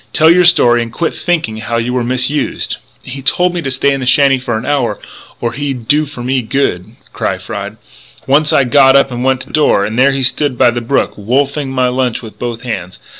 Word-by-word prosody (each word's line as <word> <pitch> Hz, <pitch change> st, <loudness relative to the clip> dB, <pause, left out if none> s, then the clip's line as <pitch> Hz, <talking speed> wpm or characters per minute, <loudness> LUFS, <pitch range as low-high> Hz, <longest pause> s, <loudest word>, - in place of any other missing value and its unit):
"Tell 160 Hz, +1 st, +5 dB
your 180 Hz, +1 st, +4 dB
story 120 Hz, -9 st, +4 dB
and 115 Hz, -1 st, -5 dB
quit 165 Hz, +7 st, -2 dB
thinking 160 Hz, -11 st, -2 dB
how 115 Hz, +2 st, -3 dB
you 120 Hz, +2 st, -2 dB
were 125 Hz, -1 st, 0 dB
misused!" 130 Hz, +4 st, -1 dB, 0.3 s
"He 135 Hz, +1 st, -7 dB
told 180 Hz, +6 st, +2 dB
me 175 Hz, -, -3 dB
to 135 Hz, -, -3 dB
stay 135 Hz, +2 st, +1 dB
in 135 Hz, -, -3 dB
the 130 Hz, -, -4 dB
shanty 135 Hz, 0 st, +4 dB
for 120 Hz, -3 st, -3 dB
an 110 Hz, -, -6 dB
hour 140 Hz, -4 st, 0 dB, 0.4 s
or 115 Hz, -1 st, -3 dB
he'd 135 Hz, -4 st, -5 dB
do 150 Hz, +3 st, +2 dB
for 140 Hz, -4 st, -8 dB
me 130 Hz, +1 st, 0 dB
good," 110 Hz, -7 st, -2 dB, 0.2 s
cried -, -, -3 dB
Fry.... -, -, -6 dB, 0.5 s
"Once 150 Hz, +3 st, +2 dB
I 140 Hz, -, +4 dB
got 135 Hz, +1 st, +4 dB
up 140 Hz, -1 st, +3 dB
and 120 Hz, 0 st, -4 dB
went 130 Hz, 0 st, +1 dB
to -, -, -11 dB
the -, -, -15 dB
door; 145 Hz, -10 st, +2 dB
and 110 Hz, +3 st, -3 dB
there 135 Hz, +2 st, +5 dB
he 135 Hz, -1 st, -2 dB
stood 130 Hz, +1 st, +1 dB
by 120 Hz, -, +4 dB
the 120 Hz, 0 st, -4 dB
brook, 125 Hz, +4 st, 0 dB
wolfing 135 Hz, +6 st, -1 dB
my 130 Hz, -1 st, 0 dB
lunch 125 Hz, -1 st, -1 dB
with 110 Hz, -, -11 dB
both 120 Hz, -1 st, -5 dB
hands. 95 Hz, -7 st, -5 dB
130 Hz, 230 wpm, -14 LUFS, 120-140 Hz, 0.5 s, Tell